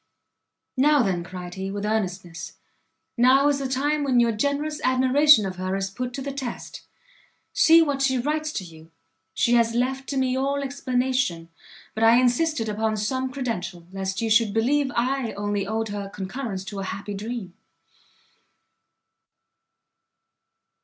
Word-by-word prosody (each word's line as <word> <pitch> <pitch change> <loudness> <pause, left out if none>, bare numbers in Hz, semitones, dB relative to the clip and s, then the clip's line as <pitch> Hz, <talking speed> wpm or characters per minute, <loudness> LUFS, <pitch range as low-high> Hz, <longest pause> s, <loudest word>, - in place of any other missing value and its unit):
"Now, 290 0 +4
then," 180 -4 -1
cried 180 0 -8
he, 190 +1 -5
with 205 +1 -4
earnestness, 185 -5 -3 0.6
"now 260 +4 +5
is 285 -1 +1
the 275 - -2
time 290 +3 0
when 260 -3 +3
your 235 -1 +3
generous 285 +7 -2
admiration 260 -1 +5
of 185 -1 -5
her 185 +1 -2
is 195 0 -2
put 250 +4 -4
to 270 - -5
the 280 - -4
test; 265 -4 -6 0.7
see 330 +1 +6
what 285 -3 -1
she 265 -1 +2
writes 305 +4 -1
to 190 - -3
you; 160 -2 -14 0.5
she 235 - +2
has 230 -1 +3
left 265 +2 -1
to 275 - -2
me 260 -1 +1
all 280 +2 -1
explanation: 255 -9 -1 0.4
but 220 - -2
I 230 +2 +6
insisted 255 0 +1
upon 215 +1 -1
some 260 +5 -2
credential, 190 -10 -4
lest 190 +2 -3
you 225 - -1
should 220 -1 +3
believe 270 +4 +2
I 250 0 0
only 205 -1 -2
owed 220 +1 -2
her 200 -1 -5
concurrence 195 0 -5
to 200 0 -6
a - - -3
happy 200 +2 -5
dream." 210 -2 -5
235 Hz, 155 wpm, -24 LUFS, 200-270 Hz, 0.7 s, see